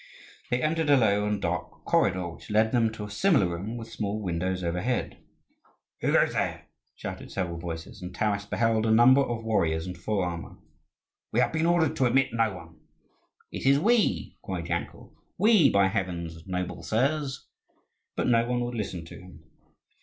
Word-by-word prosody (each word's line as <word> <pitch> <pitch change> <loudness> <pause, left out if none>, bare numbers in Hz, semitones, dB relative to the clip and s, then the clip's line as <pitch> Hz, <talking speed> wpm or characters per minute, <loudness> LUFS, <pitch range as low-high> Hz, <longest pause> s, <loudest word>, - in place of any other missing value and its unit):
They 125 +1 0
entered 160 0 0
a 145 - +7
low 105 -3 +2
and 105 -1 -1
dark 85 -2 -4
corridor, 90 -1 +2
which 85 - -13
led 110 +1 +3
them 115 -3 +2
to 110 - -7
a 105 - -6
similar 145 - +3
room 95 +7 -5
with 115 -1 -8
small 105 -1 -3
windows 90 -1 -2
overhead. 90 +9 -2 0.8
"Who - - 0
goes - - +3
there?" - - -2 0.3
shouted - - -7
several 85 -3 -3
voices, 85 0 -7
and 90 0 -6
Taras 100 +1 -1
beheld 115 0 +1
a - - +3
number 120 +5 +6
of 120 -4 -2
warriors 80 -8 0
in 90 - -5
full 95 +2 -2
armour. 85 -2 -5 0.7
"We - - +1
have - - +2
been 160 +1 +1
ordered 170 -3 +2
to 130 - +3
admit 130 0 +2
no 115 -2 +2
one." 85 -3 -12 0.7
"It - - -3
is 140 +1 +6
we!" 225 +8 +1
cried - - -4
Yankel; - - -4 0.2
"we, 210 -8 +5
by 100 -1 +4
heavens, 85 -4 -4
noble 90 -1 -3
sirs!" 135 - -1 0.7
But - - -1
no 115 -1 +3
one 125 0 0
would 120 0 -3
listen 95 -7 -4
to - - -11
him. 90 -4 -14
105 Hz, 175 wpm, -27 LUFS, 90-125 Hz, 0.8 s, a